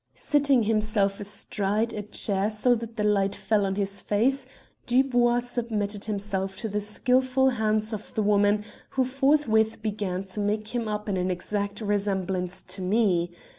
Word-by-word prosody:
"Sitting 285 -5 +2
himself 210 -2 +1
astride 205 +2 -2
a 210 - -3
chair 205 -1 0
so 220 +3 +2
that 230 -1 -4
the 210 - 0
light 200 -1 +2
fell 210 -3 +1
on 190 - -2
his 200 0 -2
face, 260 +7 +1 0.4
Dubois 245 -1 +3
submitted 220 -4 -3
himself 195 -2 -3
to 225 - -3
the 210 0 -2
skilful 255 +5 +2
hands 215 -1 0
of 215 -1 -6
the 215 - +1
woman, 205 0 +3 0.3
who 260 - +5
forthwith 255 -5 +2
began 200 -4 -2
to 195 +2 -6
make 210 +1 -1
him 235 -1 -2
up 210 0 -3
in 195 -2 0
an 180 0 0
exact 200 +3 -3
resemblance 190 -3 -1
to 190 - -5
me. 185 -3 +2
210 Hz, 160 wpm, -26 LUFS, 200-230 Hz, 0.4 s, who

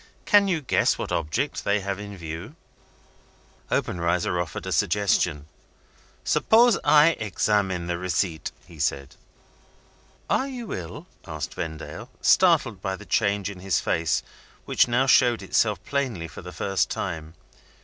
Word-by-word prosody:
Can 205 -1 +5
you 175 -5 0
guess 135 - +2
what - - -5
object 85 - -1
they 100 0 +1
have 100 0 -3
in 100 -1 -8
view?" 80 -1 -7 1.2
Obenreizer 85 0 0
offered 80 -5 -6
a - - -4
suggestion. 90 -7 +1 0.8
"Suppose 235 -1 +4
I 150 +2 +6
examine 100 -4 0
the 85 0 -3
receipt?" 90 -2 -1
he 85 -2 -15
said. 70 -1 -2 1.1
"Are 270 - +1
you 245 -5 -6
ill?" 85 -3 -7 0.2
asked 75 -2 -5
Vendale, 80 -1 -6
startled - - +3
by 95 -1 -2
the 105 - -12
change 100 -3 +1
in 100 -2 -7
his 95 -2 0
face, 80 -1 0 0.4
which - - +3
now 120 +2 +2
showed 120 -3 +4
itself 105 -3 +1
plainly 125 -12 -2
for - - -10
the 90 - -9
first 95 0 -1
time. 80 0 -5
95 Hz, 140 wpm, -25 LUFS, 85-115 Hz, 1.2 s, I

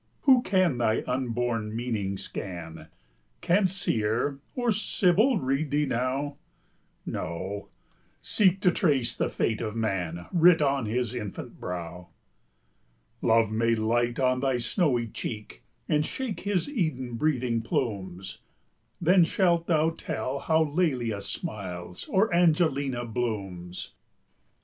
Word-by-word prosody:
Who 260 -3 +6
can 185 - +2
thy 110 -2 +1
unborn 120 -3 -1
meaning 110 -5 -2
scan? 80 -5 -7 0.5
Can 190 +3 +3
Seer 135 - 0 0.2
or 245 -2 +1
Sibyl 210 +3 +3
read 135 +2 0
thee 145 +2 +2
now? 135 +3 -1 0.7
No, 95 +4 -4 0.5
seek 190 -2 +2
to 180 - +5
trace 135 -10 +1
the - - 0
fate 110 -2 -1
of 110 -1 -3
man 90 -6 -2
Writ 175 -1 +6
on 140 -5 +1
his 120 +1 -1
infant 105 -6 -6
brow. 90 0 -6 1.1
Love 115 -1 +3
may 115 +1 +2
light 120 +2 0
on 130 -1 +2
thy 135 -1 +1
snowy 120 - +1
cheek, 105 - -7 0.3
And 150 0 +2
shake 245 +5 -4
his 200 -3 -1
Eden 155 - -2
breathing 125 -3 0
plumes; 95 -6 -3 0.6
Then 180 +1 +5
shalt 170 -1 +2
thou 160 -1 +3
tell 140 -4 -4
how 160 +2 +3
Lelia 135 - 0
smiles, 90 -3 -6
Or 200 +1 +2
Angelina 155 -7 +2
blooms. 100 -7 -4
125 Hz, 120 wpm, -27 LUFS, 110-160 Hz, 1.1 s, Who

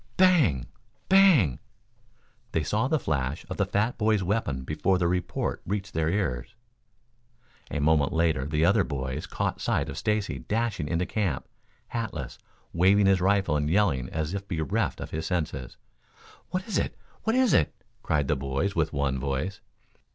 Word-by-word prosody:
Bang! 155 - +4 0.4
Bang! 180 - +5 0.9
They 80 - +1
saw 110 +10 0
the 155 - +2
flash 75 - -2
of - - -3
the 100 - +1
fat 105 +5 0
boy's 110 -2 +2
weapon 90 -9 -1
before 85 +7 +1
the 85 -1 +1
report 90 -2 -1
reached 100 +1 -3
their 80 -1 +1
ears. 95 - -2 1.1
A - - -2
moment 75 -1 +3
later 80 -5 +1
the 75 +2 +2
other 100 +2 +4
boys 65 -1 -4
caught - - -2
sight 70 - 0
of 70 +4 -5
Stacy 105 0 -1
dashing 105 -8 -1
into 85 +2 0
camp, 95 -12 -2 0.4
hatless, 115 -4 -4 0.3
waving 95 +4 +4
his 95 -2 +4
rifle 95 -4 +2
and 75 0 0
yelling 80 -10 +2
as 80 +2 -3
if 100 0 -4
bereft 80 -6 -1
of - - -6
his 80 +1 -3
senses. 75 -8 -3 0.7
"What 185 0 -3
is 220 - 0
it? - - -3 0.2
What 225 +1 0
is 255 -4 +4
it?" 75 - +4 0.3
cried 75 -3 0
the 75 - +2
boys 70 +8 -2
with 80 -2 +1
one 70 -3 -1
voice. 70 +8 -3
85 Hz, 160 wpm, -27 LUFS, 75-105 Hz, 1.1 s, Bang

